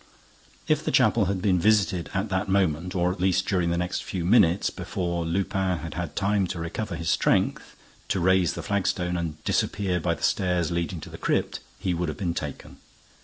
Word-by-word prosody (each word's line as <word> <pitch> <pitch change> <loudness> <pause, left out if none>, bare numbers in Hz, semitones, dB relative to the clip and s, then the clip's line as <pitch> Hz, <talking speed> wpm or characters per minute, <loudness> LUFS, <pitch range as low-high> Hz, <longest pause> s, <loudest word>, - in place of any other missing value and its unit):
If - - +2
the - - -1
chapel 115 -4 +4
had 95 0 -2
been 95 -3 +3
visited 100 -3 +2
at 95 +3 -1
that 95 +1 -1
moment 90 -2 +1
or 90 0 +2
at 95 - -6
least 95 0 +2
during 90 -3 +1
the 85 - 0
next 90 +1 -2
few 90 -4 -4
minutes, 95 -3 +4
before 85 -2 -3
Lupin 95 +1 0
had 80 +1 -6
had 85 -3 -4
time 100 -1 +1
to 85 -1 -5
recover 85 +3 -4
his 85 0 -1
strength, - - +1 0.3
to 95 - 0
raise 90 -2 +3
the - - -6
flagstone 90 -3 0
and 80 -3 -4
disappear 95 -3 0
by 85 0 0
the - - -12
stairs 90 -3 +1
leading 85 0 -2
to - - -9
the - - -9
crypt, - - 0 0.2
he 90 - -1
would 85 -1 -1
have 75 - -5
been 85 -4 -1
taken. 75 -4 -6
90 Hz, 200 wpm, -26 LUFS, 85-95 Hz, 0.3 s, chapel